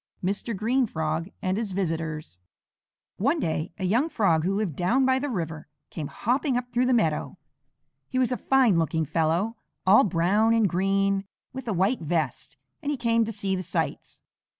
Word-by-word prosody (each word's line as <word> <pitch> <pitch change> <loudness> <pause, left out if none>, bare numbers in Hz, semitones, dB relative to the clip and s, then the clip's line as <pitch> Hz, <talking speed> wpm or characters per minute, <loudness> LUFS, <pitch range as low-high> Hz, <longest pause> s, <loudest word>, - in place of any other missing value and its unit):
MR 200 +3 -2
GREEN 240 +5 +1
FROG 160 0 -2
AND 185 +1 0
HIS 215 -4 -2
VISITORS 160 - -3 0.8
One 280 - +1
day 160 - -2
a 195 - -5
young 240 - +2
Frog 175 - +2
who 185 - +1
lived 200 -8 -1
down 235 - +2
by 260 0 +3
the 290 +2 -2
river, 165 - -4 0.2
came 155 -4 -4
hopping 255 - 0
up 245 -1 -5
through 250 +1 +2
the - - +2
meadow. 165 -11 +1 0.7
He 255 - -3
was 255 -1 +2
a - - +1
fine 255 -10 +3
looking 160 0 0
fellow, 170 - 0 0.3
all 195 +3 +7
brown 205 +5 +2
and 225 -2 +4
green, 195 +2 +1 0.3
with 260 -2 -7
a 220 - 0
white 195 +7 +1
vest, 155 -4 -2 0.2
and 285 - -3
he 295 - -1
came 230 -1 +2
to 225 - -4
see 200 -2 -2
the 185 - -3
sights. 185 - -3
195 Hz, 180 wpm, -26 LUFS, 165-240 Hz, 0.8 s, all